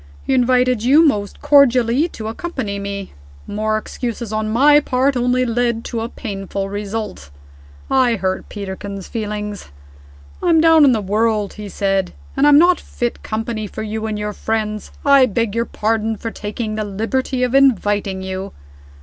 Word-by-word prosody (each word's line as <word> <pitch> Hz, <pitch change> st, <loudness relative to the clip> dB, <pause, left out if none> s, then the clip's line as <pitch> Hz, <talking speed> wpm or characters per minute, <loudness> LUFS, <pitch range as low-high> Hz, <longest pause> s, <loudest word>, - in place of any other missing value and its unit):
He -, -, 0 dB
invited 250 Hz, -2 st, +3 dB
you 290 Hz, +7 st, +5 dB
most 205 Hz, -7 st, -1 dB
cordially 275 Hz, -1 st, +4 dB
to 220 Hz, -10 st, -8 dB
accompany 225 Hz, -5 st, -4 dB
me. 200 Hz, -1 st, -6 dB, 0.3 s
More 215 Hz, +1 st, -1 dB
excuses 230 Hz, 0 st, -5 dB
on 215 Hz, 0 st, -1 dB
my 290 Hz, +6 st, +5 dB
part 270 Hz, -1 st, +1 dB
only 250 Hz, +1 st, +1 dB
led 235 Hz, -1 st, -1 dB
to 230 Hz, -2 st, -3 dB
a 230 Hz, -, -4 dB
painful 195 Hz, -4 st, -5 dB
result. 205 Hz, -, -5 dB, 0.6 s
I 255 Hz, -3 st, +3 dB
hurt 190 Hz, -2 st, -3 dB
Peterkin's 200 Hz, -1 st, -6 dB
feelings. 210 Hz, -, -5 dB, 0.7 s
'I'm 335 Hz, -2 st, +4 dB
down 320 Hz, -1 st, +6 dB
in 270 Hz, -, +6 dB
the 225 Hz, -3 st, +1 dB
world,' 210 Hz, +1 st, 0 dB
he 210 Hz, -1 st, -8 dB
said, 195 Hz, -2 st, -1 dB, 0.2 s
'and 275 Hz, +2 st, +3 dB
I'm 290 Hz, -1 st, +7 dB
not 350 Hz, +3 st, +5 dB
fit 240 Hz, -1 st, -4 dB
company 220 Hz, 0 st, -3 dB
for 215 Hz, -, -6 dB
you 220 Hz, +1 st, -4 dB
and 215 Hz, -1 st, -3 dB
your 210 Hz, 0 st, -3 dB
friends. 215 Hz, 0 st, -3 dB
I 275 Hz, -2 st, +6 dB
beg 230 Hz, -1 st, -1 dB
your 230 Hz, +1 st, 0 dB
pardon 220 Hz, 0 st, -1 dB
for 225 Hz, +2 st, -5 dB
taking 215 Hz, +1 st, -5 dB
the 215 Hz, 0 st, -2 dB
liberty 240 Hz, +6 st, -2 dB
of 250 Hz, 0 st, 0 dB
inviting 205 Hz, -7 st, +2 dB
you! 190 Hz, +1 st, -5 dB
225 Hz, 160 wpm, -19 LUFS, 205-255 Hz, 0.7 s, I'm